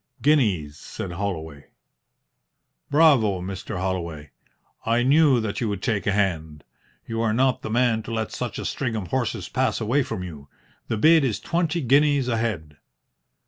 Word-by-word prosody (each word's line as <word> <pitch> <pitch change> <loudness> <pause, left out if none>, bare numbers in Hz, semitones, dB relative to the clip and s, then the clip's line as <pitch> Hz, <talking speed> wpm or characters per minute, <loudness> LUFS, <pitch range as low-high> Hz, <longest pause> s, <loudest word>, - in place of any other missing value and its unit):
"Guineas," 100 - +2
said 95 - -7
Holloway. 80 -6 -5 1.2
"Bravo, 135 - +4
Mr. 95 +1 -6
Holloway! 85 -6 -4 0.5
I 115 +2 +1
knew 140 -1 +4
that 110 -3 -3
you 115 - 0
would 100 -2 -4
take 110 -6 -1
a - - +3
hand. 80 -7 -1 0.4
You 115 0 -3
are 110 -2 +1
not 130 0 +2
the - - -5
man 120 -1 +2
to 115 - -8
let 110 -1 -2
such - - -4
a - - -5
string 125 -5 -2
of 100 -5 -4
horses 125 -6 -2
pass - - 0
away 120 +6 +1
from 130 -8 -4
you. 75 -6 -9 0.4
The 110 - -2
bid 160 +6 +5
is 110 -6 -1
twenty 170 0 -1
guineas 140 0 +3
a 115 - 0
head." 85 -11 -3
110 Hz, 165 wpm, -24 LUFS, 90-130 Hz, 1.2 s, bid